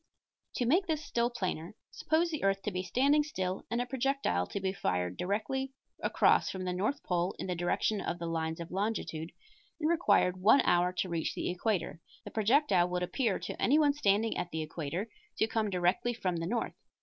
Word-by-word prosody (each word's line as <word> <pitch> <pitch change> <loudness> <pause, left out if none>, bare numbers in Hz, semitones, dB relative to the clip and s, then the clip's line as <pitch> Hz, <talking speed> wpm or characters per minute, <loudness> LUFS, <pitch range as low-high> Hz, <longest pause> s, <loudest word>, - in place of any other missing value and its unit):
To 245 - 0
make 355 +10 +3
this 310 -2 -1
still 235 -3 +1
plainer, 185 -6 -4 0.2
suppose 330 +2 +1
the 310 - -3
earth 195 0 +1
to 210 - -2
be 185 -1 -2
standing 275 +10 +3
still 190 -11 -3
and 235 - -1
a 245 - 0
projectile 260 - 0
be 190 -1 -2
fired 90 - -1
directly 265 - -2 0.3
across - - +3
from 190 -1 -4
the 180 - -1
north 215 +11 -1
pole 175 +1 0
in - - -4
the 185 - -1
direction 175 +4 0
of - - -3
the 170 - -5
lines 160 -1 -2
of 170 0 -7
longitude 185 -5 -2 0.5
and 310 - +1
required 315 - +3
one 225 +8 +6
hour 175 +1 +3
to 185 0 -2
reach 165 -2 -2
the - - -1
equator, 180 -3 -1 0.3
the - - -7
projectile 210 - +3
would 180 0 -1
appear 225 +3 0
to - - -6
anyone 290 +2 +4
standing 220 -5 +2
at 175 - -2
the 160 -1 -3
equator 165 +6 -4 0.3
to - - +3
come 220 -1 -1
directly 185 +6 +1
from 185 -6 -1
the 165 0 -3
north. 230 +4 -1
195 Hz, 195 wpm, -31 LUFS, 175-245 Hz, 0.5 s, one